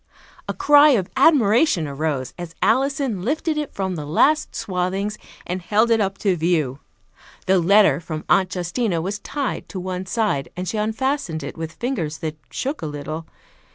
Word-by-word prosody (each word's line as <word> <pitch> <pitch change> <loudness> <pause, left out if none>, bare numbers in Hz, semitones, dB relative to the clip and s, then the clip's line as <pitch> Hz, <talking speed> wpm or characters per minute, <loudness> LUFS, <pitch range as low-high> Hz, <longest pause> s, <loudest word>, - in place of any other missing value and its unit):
A - - 0
cry 290 +1 +6
of 185 -3 -3
admiration 230 - +4
arose 140 -2 -2
as 175 -2 -8
Alison 270 - +1
lifted 310 - -1
it 300 -2 -3
from 190 -1 -2
the 150 -3 -5
last 300 - +2
swathings 195 0 -2 0.3
and 180 +1 -3
held 215 +6 +2
it 225 -1 +4
up 195 -1 -1
to 190 -3 +4
view. 155 -6 0 0.7
The 190 0 +4
letter 185 -4 +5
from 155 -2 -6
Aunt 190 -1 +3
Justina 180 +1 -1
was 195 +5 -3
tied 280 +5 -4
to 190 - -5
one 185 0 -4
side, 210 -10 0
and 180 +1 -4
she 215 - -2
unfastened 220 - -1
it 140 - -6
with 160 -1 -6
fingers 180 - -3
that 160 -2 -4
shook 280 +4 -3
a 160 - -3
little. 155 +2 -6
190 Hz, 170 wpm, -22 LUFS, 160-230 Hz, 0.7 s, cry